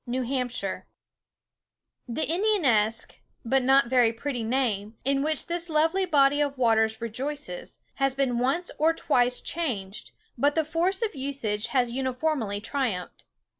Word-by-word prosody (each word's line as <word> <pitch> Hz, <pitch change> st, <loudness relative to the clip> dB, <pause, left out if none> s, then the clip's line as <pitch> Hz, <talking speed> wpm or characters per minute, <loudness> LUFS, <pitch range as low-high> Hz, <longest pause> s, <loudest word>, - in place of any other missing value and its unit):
The 250 Hz, -4 st, -2 dB, 1.4 s
Indianesque, 280 Hz, -, +1 dB, 0.3 s
but 265 Hz, +3 st, +2 dB
not 270 Hz, +1 st, +5 dB
very 240 Hz, -2 st, +3 dB
pretty 245 Hz, +2 st, -4 dB
name, 225 Hz, -3 st, -1 dB
in 275 Hz, 0 st, +2 dB
which 310 Hz, 0 st, -1 dB
this 340 Hz, 0 st, -2 dB
lovely 325 Hz, +5 st, +2 dB
body 290 Hz, -2 st, +4 dB
of 285 Hz, -2 st, -1 dB
waters 220 Hz, -2 st, +2 dB
rejoices, 285 Hz, -, -5 dB, 0.2 s
has 275 Hz, -1 st, +1 dB
been 260 Hz, -3 st, 0 dB
once 275 Hz, +8 st, 0 dB
or 320 Hz, +2 st, +3 dB
twice 245 Hz, -3 st, +1 dB
changed, 235 Hz, -, -4 dB, 0.3 s
but 290 Hz, +3 st, +3 dB
the 320 Hz, -1 st, +2 dB
force 350 Hz, +7 st, 0 dB
of 440 Hz, -, -1 dB
usage 260 Hz, -7 st, -3 dB
has 250 Hz, -3 st, +1 dB
uniformly 255 Hz, -4 st, -1 dB
triumphed. 225 Hz, -6 st, -3 dB
265 Hz, 130 wpm, -26 LUFS, 235-300 Hz, 1.4 s, not